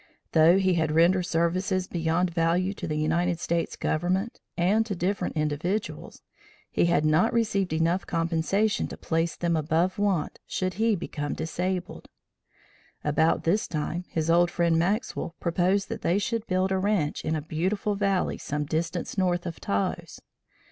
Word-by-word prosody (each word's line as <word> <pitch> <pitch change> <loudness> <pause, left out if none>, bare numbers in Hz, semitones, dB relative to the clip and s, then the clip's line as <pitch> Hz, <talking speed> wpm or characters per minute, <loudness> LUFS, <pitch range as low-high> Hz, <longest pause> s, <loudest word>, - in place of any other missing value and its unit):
Though 165 +3 +6
he 190 -1 +2
had 160 -3 +1
rendered 175 +3 +3
services 185 +3 0
beyond 170 +1 0
value 175 +3 +1
to - - -6
the 155 - -2
United 170 +3 +1
States 170 +1 -1
government, 185 +7 -1 0.2
and 195 +6 +3
to 200 - -2
different 180 +2 -1
individuals, 155 - -2 0.5
he - - +2
had 170 -3 +2
not 160 +9 +3
received 210 -6 +1
enough 165 +3 +1
compensation 170 +5 0
to - - -8
place 165 +1 -1
them 170 -1 0
above 160 +5 0
want 195 -6 0
should 185 -1 -2
he 225 -1 +3
become 150 -4 -4
disabled. 180 +3 -3 0.9
About 160 +2 +2
this 195 +6 +1
time, 170 +3 -3
his 160 -1 -2
old 175 +1 +4
friend, 170 -2 +2
Maxwell, 190 -2 -1
proposed 185 +3 +1
that - - -5
they 175 - +2
should 225 +2 -2
build 185 +1 +1
a 190 - +1
ranch 190 -7 0
in 160 - -1
a - - 0
beautiful 185 +7 -1
valley 195 -2 0
some 150 +1 -3
distance 165 +5 -2
north 175 -1 +1
of 170 -2 -5
Taos. 100 0 -2
175 Hz, 155 wpm, -27 LUFS, 165-190 Hz, 0.9 s, Though